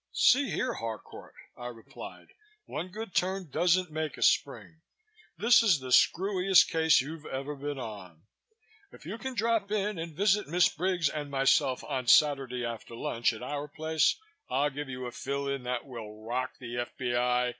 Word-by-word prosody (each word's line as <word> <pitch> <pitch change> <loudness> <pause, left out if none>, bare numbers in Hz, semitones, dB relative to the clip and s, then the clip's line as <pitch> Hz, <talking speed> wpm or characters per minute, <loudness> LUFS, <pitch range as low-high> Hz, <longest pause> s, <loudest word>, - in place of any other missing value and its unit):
"See 275 +2 +4
here, 255 - -1
Harcourt," 115 -2 -7 0.2
I 120 - -7
replied. 115 -2 -10 0.4
"One 165 +4 -5
good 210 +1 -7
turn 185 -3 -1
doesn't 180 0 +2
make 155 -1 -3
a - - -1
spring. 160 +3 +1 0.6
This 235 +3 +6
is 200 -10 +4
the 130 -1 -7
screwiest 190 +5 +4
case 160 -3 +4
you've 150 +3 -8
ever 140 +2 -4
been 145 +1 -5
on. 100 -9 -8 0.7
If - - -15
you 205 +8 -6
can 265 0 -5
drop 225 -2 0
in 210 -3 -1
and 165 -1 -6
visit 205 -1 +2
Miss 175 +4 +4
Briggs 180 -1 0
and 145 -1 -4
myself 135 -1 +2
on 130 -4 -3
Saturday 135 -4 +4
after 115 0 -6
lunch 115 0 0
at 115 +1 -8
our 145 +3 -4
place, 155 +1 +1 0.3
I'll 145 +1 +1
give 145 0 -6
you 125 0 -5
a 120 - -5
fill 140 +2 -3
in 140 -1 -2
that 125 -1 -2
will 110 -5 -9
rock 125 +3 -3
the 120 -1 -6
F.B.I. 125 0 0
145 Hz, 170 wpm, -29 LUFS, 125-180 Hz, 0.7 s, This